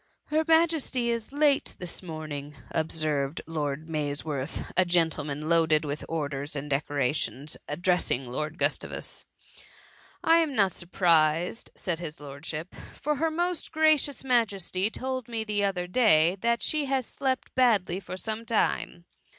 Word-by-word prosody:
" - - -52
Her 310 +1 +3
Majesty 320 -7 +3
is 230 0 -3
late 285 -1 +2
this 180 -1 -3
morning,'*' 155 -4 -6 0.2
observed 155 -2 0
Lord 155 -1 -3
Mays 150 -2 -2
worth, 145 -1 -3
a 185 - +6
gentleman 155 -4 0
loaded 160 -2 +3
with 145 +1 -4
orders 145 -2 -2
and 140 +1 -4
decorations, 145 0 0
addressing 170 -4 +1
Lord 150 +6 -4
Gustavus: - - -1 0.3
— - - -22
" - - -27
I 330 +1 +6
am 315 -5 +1
not 195 -4 +4
surprised," 170 +2 +2
said 175 -4 -3
his 165 -2 -6
lordship, 150 +4 -7
" - - -16
for 300 0 0
her 325 +3 +1
most 345 +2 -2
gracious 310 -3 +2
Majesty 205 -6 +1
told 260 0 -4
me 230 -2 -2
the 210 -1 0
other 185 -3 0
day, 180 -5 +4
that 235 0 +1
she 305 -2 +1
has 265 -2 0
slept 260 +1 -2
badly 205 -8 +3
for 185 -1 -7
some 220 +3 -3
time.'' 210 -6 0
175 Hz, 150 wpm, -28 LUFS, 155-240 Hz, 0.3 s, a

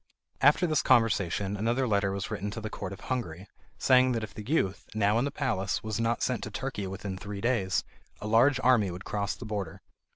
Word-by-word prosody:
After 150 +6 +5
this 155 -4 +2
conversation 105 -5 +2
another 120 +5 0
letter 100 -3 +1
was 100 0 -4
written 100 +1 -3
to - - -1
the 110 0 -6
Court 95 -2 -5
of 100 - -9
Hungary, 100 -8 -4 0.3
saying 130 0 +4
that 115 -2 -2
if 110 - -7
the - - -7
youth, 105 -7 -1
now 105 +1 +3
in 125 - +1
the - - 0
palace, 115 -10 -1
was 110 0 -3
not 115 +1 0
sent 125 -2 0
to - - -4
Turkey 110 -3 -4
within 95 0 -5
three 100 0 -6
days, 100 -5 +1 0.4
a - - -7
large 120 +5 +4
army 120 -6 +4
would 90 +2 -7
cross 100 -1 -2
the 120 - -9
border. 100 -6 -4
110 Hz, 215 wpm, -29 LUFS, 100-125 Hz, 0.4 s, After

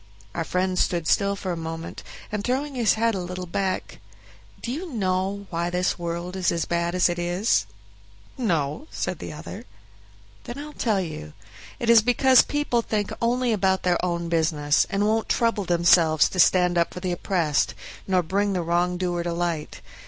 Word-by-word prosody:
Our - - -2
friend 185 0 -1
stood 170 -2 +1
still 200 0 +2
for 190 -2 -4
a - - -2
moment, 165 0 -6 0.3
and 210 -1 -2
throwing 275 +5 -1
his 235 -6 +2
head 230 +1 +1
a 195 - -2
little 180 0 -5
back, 190 +2 -3 0.6
"Do 235 - -4
you 330 +6 -5
know 195 -2 -1
why 170 0 -1
this 180 0 0
world 170 +2 -4
is 185 -2 +1
as 170 -2 -1
bad 170 +1 -1
as 180 - +4
it 175 0 -2
is?" 175 - +1 0.7
"No," 170 - -1
said - - -3
the - - -6
other. - - -8 0.8
"Then 240 +1 -7
I'll 300 +1 -7
tell 215 -8 0
you. 150 - -7 0.5
It 240 - -3
is 230 -1 +7
because 250 +3 +5
people 290 -5 0
think 210 -2 -2
only 240 0 +1
about 190 -2 +1
their 180 -1 +1
own 170 -1 -1
business, 155 -3 +2
and 200 0 0
won't 220 +1 +1
trouble 230 -4 +1
themselves 170 -2 +4
to 185 - -5
stand 180 -1 +4
up 170 - 0
for - - -4
the 180 0 -2
oppressed, 170 -4 0 0.3
nor 185 -2 +2
bring 200 +4 0
the 180 -2 -1
wrongdoer 175 +1 0
to 170 0 -2
light. 170 -3 -3
180 Hz, 180 wpm, -24 LUFS, 170-215 Hz, 0.8 s, is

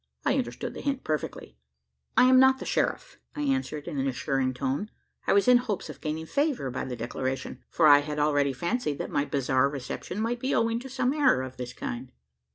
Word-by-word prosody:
I - - +3
understood - - -4
the - - -7
hint 275 -2 -2
perfectly. 150 - -4 0.6
"I - - +8
am 255 0 +7
not 265 0 +6
the - - -7
sheriff," - - -1 0.2
I 295 - -3
answered 265 - -1
in 150 -5 -3
an 135 - 0
assuring 135 0 0
tone. 140 +10 -2 0.4
I - - +4
was 200 +4 +3
in 250 0 +8
hopes 220 -6 -3
of - - -15
gaining 155 +1 -3
favour 280 - 0
by 130 - -3
the 125 - -4
declaration: 130 +3 -4
for 165 - +2
I 145 -1 +9
had 150 +1 -4
already 145 -2 +2
fancied 170 - -2
that - - -5
my 145 - +1
bizarre 135 -2 +1
reception 140 +7 -5
might 235 +2 -1
be 260 +3 0
owing 230 0 +1
to 265 +2 -9
some 255 0 0
error 280 - +3
of 130 0 -8
this 125 0 -6
kind. 125 +1 -6
150 Hz, 210 wpm, -27 LUFS, -, 0.6 s, I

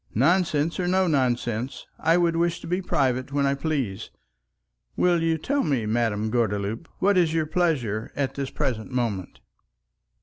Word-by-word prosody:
"Nonsense 160 - +2
or 180 - 0
no 185 +1 +3
nonsense, 125 -5 -1
I 165 +2 +3
would 170 -1 +2
wish 170 0 +1
to - - -9
be 180 +3 -1
private 130 -6 0
when 140 0 +1
I 140 - +2
please. 135 -9 -2 0.9
Will 175 -2 +3
you 165 0 +1
tell 280 - 0
me, 135 -9 0
Madame 110 -1 0
Gordeloup, 110 - -1
what 195 -1 +3
is 165 -2 +2
your 160 -1 +1
pleasure 145 - 0
at 135 -2 -1
the 140 -1 -3
present 110 -5 -3
moment?" 115 -8 -3
140 Hz, 160 wpm, -25 LUFS, 120-165 Hz, 0.9 s, no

